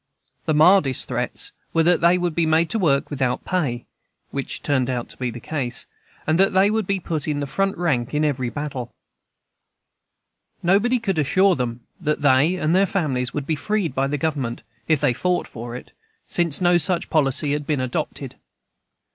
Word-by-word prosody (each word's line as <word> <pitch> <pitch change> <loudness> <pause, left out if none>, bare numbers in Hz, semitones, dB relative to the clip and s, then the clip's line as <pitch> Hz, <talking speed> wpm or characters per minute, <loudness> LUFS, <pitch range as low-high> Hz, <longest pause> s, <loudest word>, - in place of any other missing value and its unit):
The 155 - +2
mildest 155 -4 +4
threats - - -2 0.2
were 165 - +4
that 175 +1 +3
they 170 +2 +5
would 175 -2 -1
be 165 0 +1
made 160 +1 +2
to 225 - 0
work 145 -7 +1
without 130 -3 -1
pay 140 -10 -1 0.5
(which 140 -1 -4
turned 130 -3 +1
out 125 -2 -3
to - - -10
be 125 -1 -2
the 120 - -7
case), 130 -2 -3 0.4
and 155 +3 +1
that 195 - +4
they 195 +2 +4
would 220 -3 -1
be 195 -1 0
put 160 -3 -3
in 150 -1 -1
the 145 - -2
front 195 +7 -1
rank 135 -9 0
in 150 +1 +1
every 130 -4 -1
battle. 135 -1 -5 1.7
Nobody 205 +8 +3
could 195 -8 -1
assure 185 +7 +3
them 125 -2 -3 0.2
that 150 -3 -1
they 145 +5 +4
and 165 -1 +1
their 195 +1 +4
families 135 -10 -1
would 145 -2 -2
be 155 - 0
freed 200 -2 -1
by 135 +1 0
the 145 +1 -1
Government, 140 -6 -2 0.2
if 155 -3 +3
they 125 - +2
fought 180 +8 0
for 120 +1 -8
it, - - -9 0.3
since 170 -3 0
no 175 -1 +5
such 175 +2 0
policy 145 -1 +2
had 145 -1 -3
been 150 -3 0
adopted. 130 -1 -4
150 Hz, 190 wpm, -22 LUFS, 135-180 Hz, 1.7 s, they